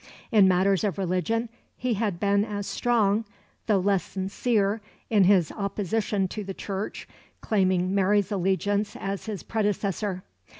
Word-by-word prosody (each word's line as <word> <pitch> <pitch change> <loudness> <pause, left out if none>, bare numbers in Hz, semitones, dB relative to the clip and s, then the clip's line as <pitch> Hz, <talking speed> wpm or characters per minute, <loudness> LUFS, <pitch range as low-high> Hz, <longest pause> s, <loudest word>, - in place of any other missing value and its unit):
In 205 -4 +6
matters 190 +2 +3
of 200 -6 -1
religion 195 +5 0 0.3
he 250 -1 0
had 205 -5 -1
been 200 +1 +2
as 205 -2 -4
strong, 220 -3 +1 0.4
though 210 -3 +4
less 195 0 +2
sincere, 200 +2 -1 0.3
in 205 -4 +5
his 185 -4 +4
opposition 200 0 -1
to 210 - -5
the 195 -1 -6
Church 200 +1 -5 0.3
claiming 185 -3 +1
Mary's 200 +1 +2
allegiance 200 +2 0
as 195 +2 -4
his 210 -4 -4
predecessor. 205 -3 -1
200 Hz, 135 wpm, -26 LUFS, 190-210 Hz, 0.4 s, In